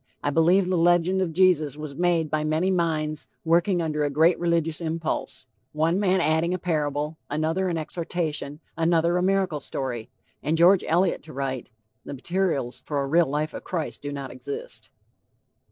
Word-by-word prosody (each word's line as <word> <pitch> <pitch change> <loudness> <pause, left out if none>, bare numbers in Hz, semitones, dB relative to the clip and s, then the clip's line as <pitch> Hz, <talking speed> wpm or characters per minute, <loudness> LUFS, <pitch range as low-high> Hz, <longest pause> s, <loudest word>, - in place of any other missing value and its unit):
I 145 - +1
believe 175 +5 +4
the 185 -2 +1
legend 175 +2 +3
of 180 -3 0
Jesus 160 -5 +3
was 150 -2 -6
made 170 -1 +1
by 155 -1 0
many 155 +5 +1
minds 155 -4 -1 0.2
working 170 +2 +2
under 150 -2 -1
a 145 - +1
great 160 +5 +3
religious 170 -2 0
impulse 165 0 -3 0.3
one 160 +4 +1
man 190 -2 +2
adding 165 +2 +1
a - - -2
parable, 150 -3 -2
another 160 +5 0
an 170 - -1
exhortation, 160 -2 -3
another 170 +1 +2
a - - +1
miracle 190 -4 +1
story;" 125 -4 -4 0.3
and 155 +3 0
George 175 +3 +6
Eliot 175 +2 +2
to 155 - -12
write: 135 -2 -3 0.3
"The - - -7
materials 160 -4 -1
for 145 -2 -2
a 140 - 0
real 165 +4 +3
life 150 +3 -2
of - - -7
Christ 165 -5 -4
do 145 - -5
not 140 -2 -6
exist." 440 - -7
165 Hz, 170 wpm, -25 LUFS, 150-175 Hz, 0.3 s, George